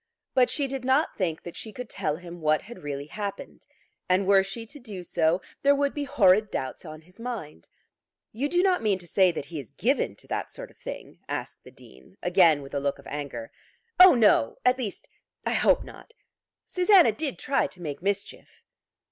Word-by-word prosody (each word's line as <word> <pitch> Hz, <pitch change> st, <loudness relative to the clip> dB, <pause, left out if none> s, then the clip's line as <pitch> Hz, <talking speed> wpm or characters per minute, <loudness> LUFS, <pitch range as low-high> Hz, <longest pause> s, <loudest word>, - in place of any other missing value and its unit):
But 255 Hz, -2 st, +4 dB
she 285 Hz, -, +1 dB
did 270 Hz, -1 st, -4 dB
not 265 Hz, +5 st, +2 dB
think 165 Hz, -5 st, -2 dB
that 175 Hz, -, -8 dB
she 220 Hz, -, -7 dB
could 250 Hz, +3 st, -7 dB
tell 150 Hz, -, -2 dB
him 175 Hz, 0 st, -10 dB
what 155 Hz, 0 st, +2 dB
had 240 Hz, +2 st, -11 dB
really 145 Hz, -1 st, -5 dB
happened; 200 Hz, +5 st, -7 dB, 0.4 s
and 185 Hz, +2 st, +3 dB
were 195 Hz, 0 st, +6 dB
she 225 Hz, +4 st, -6 dB
to 290 Hz, +6 st, -12 dB
do 210 Hz, -8 st, -8 dB
so, 170 Hz, +1 st, +1 dB, 0.2 s
there 280 Hz, +1 st, +5 dB
would 280 Hz, 0 st, 0 dB
be 290 Hz, -1 st, -3 dB
horrid 215 Hz, -7 st, +4 dB
doubts 130 Hz, -, -4 dB
on 155 Hz, -1 st, -9 dB
his 180 Hz, +6 st, -20 dB
mind. 225 Hz, -, -7 dB, 0.6 s
"You 270 Hz, +7 st, -2 dB
do 355 Hz, +2 st, +2 dB
not 370 Hz, -2 st, +3 dB
mean 210 Hz, -3 st, +1 dB
to 180 Hz, -, -13 dB
say 185 Hz, +1 st, +4 dB
that 145 Hz, -, -5 dB
he 155 Hz, +1 st, -6 dB
is 135 Hz, -, -9 dB
given -, -, 0 dB
to -, -, -11 dB
that -, -, -3 dB
sort -, -, -9 dB
of -, -, -26 dB
thing?" -, -, -8 dB
asked -, -, -5 dB
the -, -, -13 dB
Dean, 65 Hz, 0 st, -18 dB
again 175 Hz, -5 st, +4 dB
with 135 Hz, -, -12 dB
a 140 Hz, -, 0 dB
look 140 Hz, 0 st, -1 dB
of 140 Hz, -, -16 dB
anger. 140 Hz, -6 st, -6 dB, 0.5 s
"Oh 365 Hz, -4 st, +10 dB
no, 210 Hz, -, +4 dB
at 250 Hz, +1 st, +4 dB
least 220 Hz, -6 st, -5 dB, 0.4 s
I -, -, 0 dB
hope -, -, +3 dB
not. 460 Hz, -, -14 dB, 0.5 s
Susanna 365 Hz, -, +5 dB
did 280 Hz, +5 st, -4 dB
try 275 Hz, +1 st, +1 dB
to 180 Hz, -, -15 dB
make 150 Hz, -4 st, -6 dB
mischief." 200 Hz, +1 st, -4 dB
195 Hz, 205 wpm, -26 LUFS, 155-255 Hz, 0.6 s, Oh